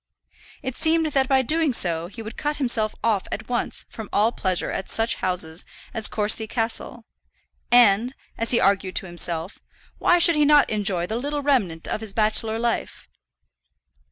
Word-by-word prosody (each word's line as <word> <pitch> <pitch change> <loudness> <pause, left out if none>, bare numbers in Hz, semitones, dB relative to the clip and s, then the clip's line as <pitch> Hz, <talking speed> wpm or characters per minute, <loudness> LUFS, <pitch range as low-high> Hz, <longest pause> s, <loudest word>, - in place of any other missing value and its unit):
It 260 - -4
seemed 320 0 +1
that 270 -2 +1
by 265 -1 +3
doing 310 +1 +1
so 170 -6 +1
he 225 +5 -9
would 220 - -8
cut 295 0 -3
himself 235 -6 +1
off 215 -4 0
at 215 - -5
once 245 -1 -2
from 220 -3 -9
all 215 +3 +2
pleasure 185 -6 -1
at 190 - -5
such 225 +1 0
houses 175 -3 -2 0.3
as 225 -3 +2
Courcy 220 +1 +1
Castle; 230 0 -3 0.7
and, 240 +1 +4 0.2
as 230 - -2
he 240 - +4
argued 195 -1 +1
to - - 0
himself, 175 +1 -1 0.4
why 350 - +4
should 335 -1 +5
he 300 - +3
not 295 -3 +4
enjoy 195 -5 0
the 220 +5 -4
little 290 +3 -3
remnant 205 - 0
of - - -3
his 215 -3 -2
bachelor 220 +1 +1
life? 235 0 -3
225 Hz, 170 wpm, -23 LUFS, 195-260 Hz, 0.7 s, should